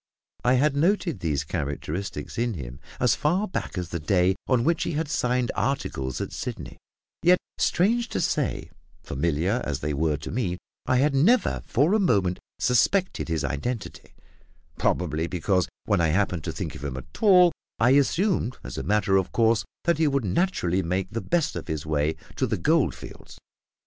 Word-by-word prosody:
I 125 Hz, +1 st, +4 dB
had 140 Hz, +2 st, +2 dB
noted 170 Hz, +2 st, +1 dB
these 75 Hz, -4 st, -1 dB
characteristics 75 Hz, +3 st, -4 dB
in 120 Hz, -2 st, 0 dB
him 65 Hz, -3 st, -7 dB, 0.2 s
as 125 Hz, -2 st, +4 dB
far 180 Hz, +8 st, +1 dB
back 180 Hz, -, -4 dB
as 90 Hz, -2 st, -3 dB
the 85 Hz, -, -3 dB
day 90 Hz, +3 st, +2 dB
on 125 Hz, -3 st, +2 dB
which 165 Hz, +3 st, +1 dB
he -, -, -1 dB
had 155 Hz, +1 st, -1 dB
signed 125 Hz, -6 st, 0 dB
articles 100 Hz, -, -2 dB
at -, -, -4 dB
Sydney; -, -, -6 dB, 0.4 s
yet, 180 Hz, +2 st, +6 dB, 0.2 s
strange 230 Hz, +7 st, +2 dB
to -, -, -2 dB
say, -, -, -1 dB, 0.3 s
familiar 85 Hz, -, 0 dB
as 70 Hz, -3 st, -3 dB
they 75 Hz, 0 st, -1 dB
were 75 Hz, +1 st, +1 dB
to 75 Hz, -, -7 dB
me, 100 Hz, -7 st, -1 dB, 0.3 s
I 130 Hz, -, +3 dB
had 140 Hz, +3 st, +3 dB
never 190 Hz, -, +3 dB
for 145 Hz, -, +2 dB
a 220 Hz, -, +4 dB
moment 100 Hz, -, +2 dB, 0.2 s
suspected 180 Hz, +10 st, +2 dB
his 80 Hz, -4 st, -1 dB
identity, 110 Hz, -, -4 dB, 0.6 s
probably 80 Hz, +2 st, 0 dB
because, 90 Hz, +1 st, 0 dB, 0.2 s
when -, -, +2 dB
I 85 Hz, -, +3 dB
happened 90 Hz, -1 st, 0 dB
to -, -, -2 dB
think -, -, -5 dB
of -, -, -10 dB
him 65 Hz, -3 st, -4 dB
at 75 Hz, +3 st, -10 dB
all, 180 Hz, -4 st, +7 dB, 0.3 s
I 120 Hz, +2 st, +4 dB
assumed 145 Hz, -, +2 dB
as -, -, -6 dB
a -, -, -4 dB
matter 100 Hz, -2 st, +2 dB
of 95 Hz, -, -1 dB
course 115 Hz, -1 st, +3 dB, 0.2 s
that 170 Hz, -2 st, +1 dB
he 160 Hz, -, +4 dB
would 140 Hz, -4 st, 0 dB
naturally 95 Hz, -, +1 dB
make 95 Hz, +2 st, -2 dB
the 115 Hz, -, -3 dB
best 165 Hz, -2 st, 0 dB
of -, -, -5 dB
his 80 Hz, -2 st, -3 dB
way 75 Hz, 0 st, 0 dB, 0.2 s
to -, -, +1 dB
the -, -, -1 dB
gold -, -, +2 dB
fields. -, -, -12 dB
105 Hz, 180 wpm, -25 LUFS, -, 0.6 s, all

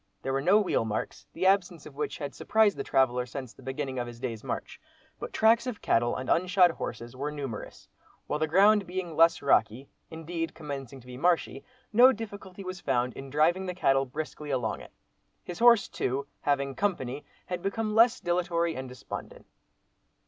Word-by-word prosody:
There 135 Hz, -, -2 dB
were 135 Hz, -, 0 dB
no 190 Hz, +8 st, +5 dB
wheel 200 Hz, -, +1 dB
marks, 110 Hz, -1 st, -4 dB
the 185 Hz, -, -3 dB
absence 185 Hz, -4 st, +2 dB
of -, -, -11 dB
which 150 Hz, -, -3 dB
had 145 Hz, -2 st, -5 dB
surprised 215 Hz, -1 st, +2 dB
the -, -, -4 dB
traveller, 125 Hz, -2 st, +1 dB
since 130 Hz, 0 st, -7 dB
the -, -, -17 dB
beginning 130 Hz, 0 st, -4 dB
of 120 Hz, -, -3 dB
his 120 Hz, -1 st, -10 dB
day's 120 Hz, -4 st, -5 dB
march, -, -, -5 dB, 0.4 s
but -, -, -6 dB
tracks 230 Hz, +2 st, +3 dB
of 245 Hz, -4 st, -4 dB
cattle 120 Hz, +1 st, +1 dB
and 130 Hz, -, -5 dB
unshod 180 Hz, 0 st, +4 dB
horses 120 Hz, -5 st, -6 dB
were 145 Hz, +3 st, -3 dB
numerous; 135 Hz, -7 st, -7 dB, 0.4 s
while 150 Hz, -, -2 dB
the 155 Hz, -, +1 dB
ground 200 Hz, +4 st, +4 dB
being 180 Hz, -2 st, -4 dB
less 165 Hz, 0 st, +4 dB
rocky, 125 Hz, 0 st, +2 dB, 0.2 s
indeed 165 Hz, 0 st, -5 dB
commencing 135 Hz, -4 st, -7 dB
to -, -, -20 dB
be 125 Hz, 0 st, -9 dB
marshy, 170 Hz, +4 st, +1 dB, 0.3 s
no 245 Hz, +4 st, +8 dB
difficulty 200 Hz, -4 st, -8 dB
was 185 Hz, -1 st, -6 dB
found 125 Hz, -2 st, 0 dB
in 135 Hz, 0 st, -9 dB
driving 165 Hz, +7 st, +2 dB
the 180 Hz, -, -4 dB
cattle 135 Hz, -5 st, +2 dB
briskly 150 Hz, +2 st, -6 dB
along 125 Hz, -6 st, -1 dB
it. -, -, -13 dB, 0.5 s
His 175 Hz, -1 st, -7 dB
horse 235 Hz, -5 st, +6 dB
too, 135 Hz, +2 st, -2 dB, 0.2 s
having 140 Hz, -1 st, 0 dB
"company," 145 Hz, -8 st, -2 dB, 0.2 s
had 180 Hz, -1 st, -4 dB
become 215 Hz, +3 st, -2 dB
less 230 Hz, +2 st, +5 dB
dilatory 170 Hz, -1 st, 0 dB
and 130 Hz, 0 st, -6 dB
despondent. 125 Hz, -1 st, -8 dB
155 Hz, 185 wpm, -28 LUFS, 130-185 Hz, 0.5 s, no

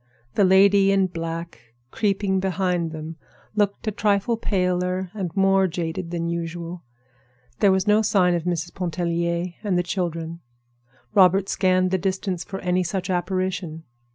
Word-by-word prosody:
The 205 Hz, -, +3 dB
lady 195 Hz, +1 st, +5 dB
in 195 Hz, -1 st, +3 dB
black, 165 Hz, -9 st, -6 dB, 0.2 s
creeping 195 Hz, -2 st, 0 dB
behind 180 Hz, -3 st, -1 dB
them, 155 Hz, +1 st, -7 dB, 0.4 s
looked 205 Hz, 0 st, 0 dB
a -, -, +2 dB
trifle 205 Hz, +2 st, +1 dB
paler 180 Hz, -3 st, -1 dB
and 195 Hz, -5 st, -3 dB
more 195 Hz, 0 st, +4 dB
jaded 170 Hz, 0 st, -4 dB
than 170 Hz, -1 st, -2 dB
usual. 170 Hz, +1 st, -4 dB, 0.8 s
There 200 Hz, -2 st, +5 dB
was 190 Hz, 0 st, +1 dB
no 210 Hz, +1 st, +4 dB
sign 190 Hz, -4 st, +3 dB
of 170 Hz, -1 st, -2 dB
Mrs. 175 Hz, -1 st, -2 dB
Pontellier 170 Hz, 0 st, -2 dB
and 195 Hz, -4 st, +1 dB
the 175 Hz, -, +1 dB
children. 170 Hz, -3 st, -3 dB, 0.7 s
Robert 190 Hz, -1 st, +5 dB
scanned 185 Hz, -1 st, +2 dB
the 190 Hz, -, +1 dB
distance 190 Hz, -1 st, -2 dB
for 195 Hz, -, -6 dB
any 180 Hz, 0 st, +1 dB
such 185 Hz, +1 st, -3 dB
apparition. 180 Hz, -2 st, -2 dB
185 Hz, 145 wpm, -23 LUFS, 170-195 Hz, 0.8 s, lady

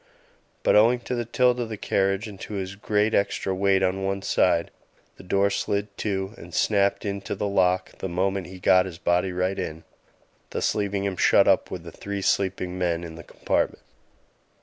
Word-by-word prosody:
But -, -, +4 dB
owing 120 Hz, +4 st, +5 dB
to 125 Hz, -, -4 dB
the 120 Hz, -1 st, -2 dB
tilt 125 Hz, +1 st, +2 dB
of 120 Hz, -2 st, -3 dB
the 110 Hz, -, -5 dB
carriage 95 Hz, +1 st, 0 dB
and 100 Hz, -3 st, -10 dB
to -, -, -8 dB
his 95 Hz, -1 st, -4 dB
great 105 Hz, +2 st, 0 dB
extra 100 Hz, -1 st, 0 dB
weight 95 Hz, 0 st, +2 dB
on 95 Hz, 0 st, +1 dB
the -, -, -5 dB
one 95 Hz, 0 st, -2 dB
side, 85 Hz, -4 st, +2 dB, 0.5 s
the -, -, -12 dB
door 100 Hz, +2 st, +2 dB
slid 100 Hz, 0 st, -2 dB
to 95 Hz, -1 st, -2 dB
and 85 Hz, 0 st, -10 dB
snapped 100 Hz, -1 st, +2 dB
into 100 Hz, -1 st, -3 dB
the 105 Hz, -, -2 dB
lock 95 Hz, -2 st, +1 dB
the 95 Hz, -, -3 dB
moment 95 Hz, +1 st, -1 dB
he 95 Hz, +1 st, -10 dB
got 90 Hz, +1 st, +4 dB
his 85 Hz, -3 st, -8 dB
body 90 Hz, +2 st, +1 dB
right 90 Hz, +2 st, -1 dB
in, 80 Hz, +1 st, -5 dB, 0.7 s
thus -, -, 0 dB
leaving 100 Hz, -1 st, -1 dB
him 100 Hz, -2 st, -2 dB
shut -, -, +5 dB
up -, -, +3 dB
with 90 Hz, -2 st, -6 dB
the 85 Hz, -, -9 dB
three 100 Hz, +2 st, -5 dB
sleeping 95 Hz, -2 st, 0 dB
me 90 Hz, -1 st, +1 dB
in 85 Hz, -1 st, -6 dB
the 85 Hz, -, -9 dB
compartment. -, -, -2 dB
95 Hz, 195 wpm, -25 LUFS, 90-100 Hz, 0.7 s, owing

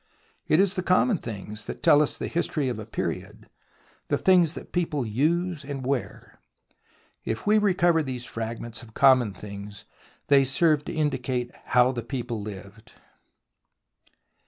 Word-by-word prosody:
It 155 Hz, -, +4 dB
is 195 Hz, -1 st, +3 dB
the 185 Hz, -, -2 dB
common 185 Hz, +3 st, +2 dB
things 105 Hz, -1 st, -7 dB
that -, -, -7 dB
tell 145 Hz, -, +6 dB
us 150 Hz, -, 0 dB
the -, -, -4 dB
history 155 Hz, -5 st, -1 dB
of 120 Hz, -, -4 dB
a 110 Hz, -, -8 dB
period, -, -, -5 dB, 0.6 s
the -, -, +1 dB
things 175 Hz, -4 st, +4 dB
that -, -, -9 dB
people 155 Hz, -7 st, -1 dB
use 155 Hz, +8 st, 0 dB
and 140 Hz, -2 st, -6 dB
wear. 135 Hz, -2 st, -4 dB, 0.8 s
If 110 Hz, -, -4 dB
we 215 Hz, +1 st, +4 dB
recover 175 Hz, -5 st, +3 dB
these 130 Hz, -4 st, -4 dB
fragments 115 Hz, +1 st, -6 dB
of 110 Hz, -3 st, -15 dB
common 130 Hz, -5 st, +5 dB
things, 100 Hz, +1 st, -9 dB, 0.4 s
they 140 Hz, -1 st, +5 dB
serve 150 Hz, +2 st, +2 dB
to -, -, -5 dB
indicate 130 Hz, -6 st, -1 dB
how 125 Hz, +1 st, +4 dB
the 120 Hz, -2 st, -4 dB
people 120 Hz, -2 st, -4 dB
lived. 100 Hz, +1 st, -10 dB
130 Hz, 150 wpm, -26 LUFS, 115-160 Hz, 0.8 s, tell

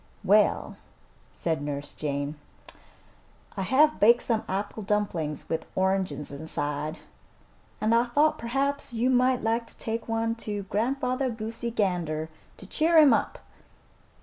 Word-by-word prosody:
"Well," -, -, +3 dB, 0.5 s
said 160 Hz, -3 st, -2 dB
Nurse 145 Hz, 0 st, -5 dB
Jane, 145 Hz, -1 st, -3 dB, 1.2 s
"I 195 Hz, -, -3 dB
have 280 Hz, +10 st, +3 dB
baked 235 Hz, +3 st, +6 dB
some 225 Hz, -2 st, 0 dB
apple 200 Hz, +3 st, -3 dB
dumplings 195 Hz, -7 st, -2 dB
with 160 Hz, -, -3 dB
oranges 185 Hz, -7 st, 0 dB
inside, 150 Hz, +1 st, -3 dB, 0.8 s
and 215 Hz, +2 st, +2 dB
I 235 Hz, +1 st, +4 dB
thought 300 Hz, +5 st, +2 dB
perhaps 275 Hz, +2 st, -1 dB
you 240 Hz, +3 st, +1 dB
might 255 Hz, 0 st, +3 dB
like 230 Hz, +1 st, 0 dB
to -, -, -7 dB
take 225 Hz, 0 st, -3 dB
one 225 Hz, 0 st, 0 dB
to 205 Hz, -3 st, -4 dB
Grandfather 255 Hz, +5 st, -1 dB
Goosey 230 Hz, +1 st, -4 dB
Gander 175 Hz, -8 st, -1 dB, 0.3 s
to -, -, -11 dB
cheer 320 Hz, -, +2 dB
him 295 Hz, -5 st, +8 dB
up." -, -, -1 dB
220 Hz, 130 wpm, -27 LUFS, 165-245 Hz, 1.2 s, him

